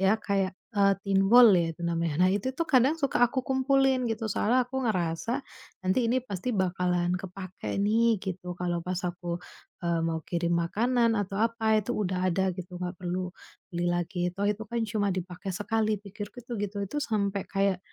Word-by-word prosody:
Ya 195 +3 +4
kayak, 195 -2 0 0.2
eee, 200 -1 +4
thinwall 200 +4 +7
ya 170 -2 +2
itu - - -10
namanya. 170 0 +1
Nah - - +3
itu 210 +6 -1
tuh, 335 - 0
kadang 265 +3 +4
suka 275 -4 +1
aku 260 +2 -2
kumpulin, 265 -1 +2
gitu. 225 0 -2
Soalnya 245 +6 +2
aku 265 +1 -3
ngerasa, 185 +6 -1 0.4
"Nanti 230 +6 +2
ini 255 +3 +3
pasti 205 +1 -3
bakalan 180 -1 +1
kepakai 185 +1 -6
nih." 225 +2 +3
Gitu, 180 -2 -5
kalau 175 -1 -1
pas 180 0 -2
aku, 175 -1 -3 0.5
eee, 170 -1 +1
mau 165 -1 -1
kirim 170 0 0
makanan 230 +7 +2
atau 195 0 -4
apa, 225 -1 +1
itu 215 +4 -3
udah 185 -2 0
ada, 190 +2 +1
gitu. 180 0 -7
Enggak 180 0 -4
perlu 180 +1 -2 0.4
beli 175 0 -1
lagi, 175 +1 -1
"Toh 200 +1 0
itu 210 +1 -2
kan 235 +2 -3
cuma 205 -1 0
dipakai 180 +1 -5
sekali." 215 +2 0
Pikirku 205 +3 -8
itu, 240 - -8
gitu. 205 0 -3
Itu 200 - -7
sampai 200 -6 -1
kayak 195 -1 +1
195 Hz, 180 wpm, -28 LUFS, 180-225 Hz, 0.5 s, thinwall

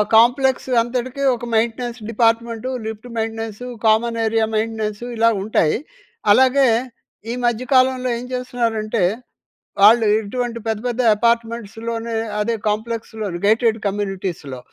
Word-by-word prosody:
Complex 255 +4 +4
అంతటికీ 250 +3 -3
ఒక 240 - -7
maintenance 235 +2 -1
department, 230 +1 0 0.2
lift 220 +2 -6
maintenance, 225 +1 -4 0.2
common 230 +2 +2
area 225 0 +2
maintenance 220 0 -2
ఇలా 230 +1 +5
ఉంటాయి. 195 -7 +2 0.6
అలాగే 260 +2 +4 0.6
ఈ - - -2
మధ్య 240 0 0
కాలంలో 255 0 +3
ఏం 240 - -7
చేస్తున్నారంటే, 230 -4 -1 0.8
వాళ్ళు 225 +2 +7
ఇటువంటి 235 +2 -4
పెద్ద 220 -1 -1
పెద్ద 245 +1 -1 0.2
అపార్ట్మెంట్స్‌లోనే 230 0 -1 0.3
అదే 230 +3 0 0.2
కాంప్లెక్స్‌లోనే 220 -3 -4
గేటెడ్ 225 0 +3
కమ్యూనిటీస్‍లో. 190 -9 -4
230 Hz, 110 wpm, -20 LUFS, 220-240 Hz, 0.8 s, వాళ్ళు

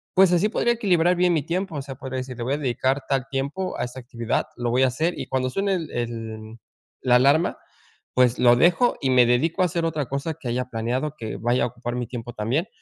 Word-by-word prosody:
pues, 190 -1 +6
así 175 +4 +3
podría 240 +1 +1
equilibrar 180 -6 +2
bien 180 0 +3
mi 155 -4 +1
tiempo, 175 +3 -3
o 145 - -2
sea, 135 -1 -8
podría 130 0 -6
decir 130 -1 -7
le 120 - -4
voy 130 +4 -1
a - - -3
dedicar 130 0 0
tal 135 -2 +1
tiempo 140 +8 -3
a - - 0
esta 125 +2 -8
actividad, 120 -2 -2
lo 120 -1 -1
voy 125 +2 +3
a 130 - +5
hacer 160 +8 -1
y - - -3
cuando 130 -1 -1
suene 195 +7 0
el 165 -4 -4
el 115 -2 -5 0.4
la 125 -1 +4
alarma, 140 +7 +3 0.6
pues, 125 -1 +3
lo 120 -1 +6
dejo 180 - +4
y 135 - 0
me 125 -1 +6
dedico 155 +10 +1
a - - +4
hacer 170 -1 -1
otra 155 -3 -1
cosa 140 +5 -3
que 125 - -5
haya 125 +2 -1
planeado 125 +6 -2
que 110 -4 -5
vaya 120 +2 +1
a - - 0
ocupar 120 0 -6
mi 125 0 -2
tiempo 120 -1 -7
también 125 - -1
130 Hz, 240 wpm, -24 LUFS, 120-165 Hz, 0.6 s, pues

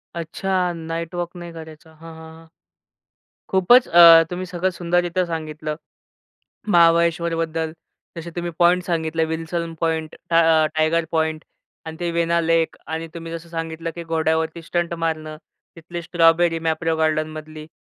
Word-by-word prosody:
अच्छा, 180 +2 -1
night 165 +1 -5
walk 175 0 -4
नाही 175 -1 -8
करायचा. 160 -1 -12
हां, 165 +1 -12
हां, 160 0 -12
हां. 165 - -17 1.0
खूपच 215 +7 +5
अ, 165 -1 +9
तुम्ही 180 +1 -4
सगळं 180 +1 -1
सुंदररित्या 175 0 0
सांगितलं. 155 -2 -5 0.9
महाबळेश्वरबद्दल. 165 -2 +2 0.4
जसे 170 +1 -7
तुम्ही 175 0 -3
पॉइंट 180 +1 +4
सांगितले 160 -2 -1
विल्सन 165 +1 -4
पॉइंट, 160 -1 -1 0.2
टा 165 -1 +4
टायगर 160 +1 +1
पॉइंट 160 -1 -1 0.4
आणि 160 0 -7
ते 175 -1 -1
वेना 170 0 +1
लेक 165 0 +1
आणि 160 +1 -4
तुम्ही 165 -1 -7
जसं 165 0 -7
सांगितलं 165 0 -5
की 170 - -6
घोड्यावरती 160 0 -1
स्टंट 170 +1 -2
मारणं. 160 -2 -3 0.4
तिथली 170 +1 -7
स्ट्रॉबेरी 165 0 +3
मॅप्रो 160 0 -1
गार्डनमधली 155 -1 -2
165 Hz, 135 wpm, -21 LUFS, 160-170 Hz, 1.0 s, अ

